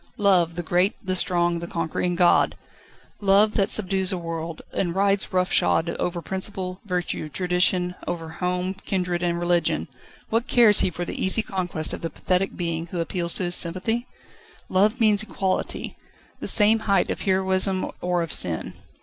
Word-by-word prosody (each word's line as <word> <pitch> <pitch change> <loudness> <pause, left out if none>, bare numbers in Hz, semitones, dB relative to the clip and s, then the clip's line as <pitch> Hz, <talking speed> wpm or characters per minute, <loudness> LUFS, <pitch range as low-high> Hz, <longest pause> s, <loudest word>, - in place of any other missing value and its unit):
Love, 180 -5 +3
the 175 - -4
great, 180 +4 +1
the 185 0 -1
strong, 175 -1 +1
the 170 - -6
conquering 170 +1 -2
god 175 0 +3 0.6
Love 205 +1 +4
that 200 -1 +1
subdues 190 -2 +1
a 185 - -2
world, 165 -1 -6
and 175 -2 -1
rides 200 0 +2
roughshod 180 -2 +1
over 175 -1 -2
principle, 190 -1 -4
virtue, 180 -4 -3
tradition, 180 +1 +1
over 165 -2 -4
home, 180 +2 -2
kindred, 180 -3 -3
and 170 -1 -1
religion 175 0 +1 0.4
what 230 +2 0
cares 225 -4 +5
he - - +2
for 175 0 -5
the - - -4
easy 190 +4 +6
conquest 180 -5 -2
of - - -6
the 165 - -3
pathetic 185 +4 -1
being, 170 -1 -3
who 175 0 -5
appeals 170 0 -1
to - - -2
his 175 0 -1
sympathy? 195 +9 0 0.6
Love 210 +6 +2
means 215 -3 +4
equality 195 -3 -3 0.4
the - - -4
same 220 +1 +5
height 195 -2 +2
of - - -4
heroism 190 0 +1
or 180 -1 0
of 165 - -4
sin. 80 -2 0
180 Hz, 165 wpm, -24 LUFS, 175-195 Hz, 0.6 s, easy